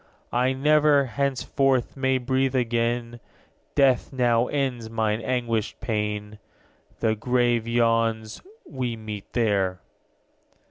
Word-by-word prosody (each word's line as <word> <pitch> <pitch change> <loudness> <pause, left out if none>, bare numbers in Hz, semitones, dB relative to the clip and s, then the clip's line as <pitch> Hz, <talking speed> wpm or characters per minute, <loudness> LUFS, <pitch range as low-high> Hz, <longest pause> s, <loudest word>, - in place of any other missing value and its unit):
'I 125 +2 +2
never, 150 +1 +4
henceforth, 135 0 0
may 130 -1 +1
breathe 130 +1 0
again; 120 -1 -1 0.6
Death 135 -4 +3
now 120 -2 +2
ends 130 -5 -2
mine 110 -1 -1
anguished 115 -3 -2
pain. 105 -2 -3 0.6
The 110 -1 +2
grave 120 0 +1
yawns, 115 -2 +1 0.2
we 125 -6 -3
meet 105 -2 -8
there.' 100 -6 +1
120 Hz, 100 wpm, -25 LUFS, 110-130 Hz, 0.6 s, never